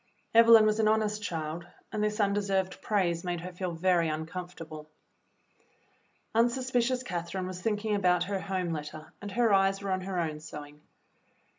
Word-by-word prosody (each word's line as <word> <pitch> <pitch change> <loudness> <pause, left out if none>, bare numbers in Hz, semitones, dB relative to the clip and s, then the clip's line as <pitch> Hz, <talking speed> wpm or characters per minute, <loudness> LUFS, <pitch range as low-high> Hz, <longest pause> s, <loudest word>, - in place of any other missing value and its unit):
Evelyn 230 -1 +8
was 215 0 +2
an 220 - +3
honest 215 -1 +1
child, 165 -2 -4 0.2
and 215 -1 -1
this 210 +1 -1
undeserved 200 -2 0
praise 175 -5 0
made 175 -2 -2
her 180 +1 -6
feel 180 0 -4
very 170 -1 +2
uncomfortable. 160 -1 -6 1.4
Unsuspicious 250 +1 +1
Catherine 175 -2 -4
was 185 0 -6
thinking 210 +1 -1
about 180 -3 +3
her 195 +1 -2
home 185 -3 -2
letter, 155 +1 -7
and 205 -1 -6
her 230 -1 +3
eyes 195 0 +3
were 195 - -2
on 185 0 0
her 185 -1 -3
own 155 -3 -2
sewing. 150 -1 -10
185 Hz, 155 wpm, -29 LUFS, 170-210 Hz, 1.4 s, Evelyn